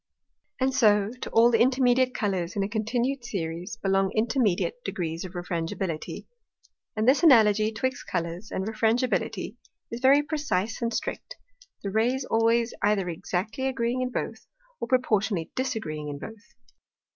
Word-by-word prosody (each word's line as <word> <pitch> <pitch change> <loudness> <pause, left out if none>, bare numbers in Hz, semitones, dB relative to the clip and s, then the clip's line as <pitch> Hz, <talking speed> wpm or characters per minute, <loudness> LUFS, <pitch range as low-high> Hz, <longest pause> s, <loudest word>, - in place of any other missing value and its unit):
And 265 0 +1
so 210 -5 +4
to - - -4
all 235 +1 +5
the 230 - +3
intermediate 255 0 +3
Colours 185 -4 -1
in 200 - 0
a - - -1
continued 235 +5 -1
Series 175 -5 -4
belong 195 -1 +1
intermediate 230 - +1
degrees 165 - -3
of 185 -1 -8
Refrangibility. 170 -1 -4 0.7
And 215 +1 0
this 265 +3 +5
Analogy 215 - +5
'twixt 250 +4 -3
Colours, 175 +3 -3
and 190 - -3
Refrangibility, 225 +3 0 0.3
is 235 - -4
very 275 +3 +5
precise 270 - -2
and 230 -1 0
strict; - - -4 0.5
the 200 - -3
Rays 245 +5 +1
always 230 +1 +2
either 200 -3 +1
exactly 190 +9 -3
agreeing 250 -1 -1
in 255 - -1
both, - - -5 0.3
or - - -3
proportionally 215 -8 +1
disagreeing 185 - -3
in 145 - -5
both. 220 +7 -11
220 Hz, 145 wpm, -26 LUFS, 190-250 Hz, 0.7 s, all